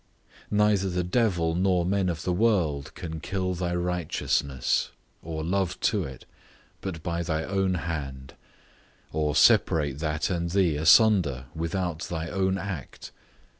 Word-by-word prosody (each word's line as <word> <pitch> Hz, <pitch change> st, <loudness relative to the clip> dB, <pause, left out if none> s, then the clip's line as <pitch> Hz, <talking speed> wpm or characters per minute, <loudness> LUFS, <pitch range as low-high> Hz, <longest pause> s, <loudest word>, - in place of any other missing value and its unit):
Neither 105 Hz, -2 st, +2 dB
the 90 Hz, 0 st, -1 dB
devil, 90 Hz, -4 st, +1 dB
nor 90 Hz, 0 st, +2 dB
men 95 Hz, 0 st, +1 dB
of 85 Hz, -1 st, -4 dB
the 90 Hz, -, 0 dB
world, 90 Hz, -9 st, +1 dB
can 80 Hz, -3 st, -6 dB
kill 95 Hz, +2 st, -2 dB
thy 90 Hz, 0 st, -2 dB
righteousness, 85 Hz, -7 st, 0 dB, 0.3 s
or 80 Hz, -1 st, -5 dB
love 90 Hz, +1 st, -1 dB
to 100 Hz, -6 st, +1 dB
it, 65 Hz, -2 st, -10 dB, 0.6 s
but 85 Hz, -5 st, -5 dB
by 85 Hz, 0 st, -2 dB
thy 80 Hz, -2 st, -1 dB
own 95 Hz, 0 st, 0 dB
hand; 70 Hz, -6 st, -5 dB, 0.8 s
or 75 Hz, -1 st, 0 dB
separate 75 Hz, -3 st, +4 dB
that 75 Hz, +2 st, -1 dB
and 85 Hz, -1 st, -1 dB
thee 90 Hz, -4 st, +2 dB
asunder, 85 Hz, -, +4 dB
without 85 Hz, 0 st, -2 dB
thy 80 Hz, 0 st, -4 dB
own 95 Hz, -1 st, 0 dB
act. 95 Hz, -9 st, -7 dB
85 Hz, 135 wpm, -26 LUFS, 80-95 Hz, 0.8 s, separate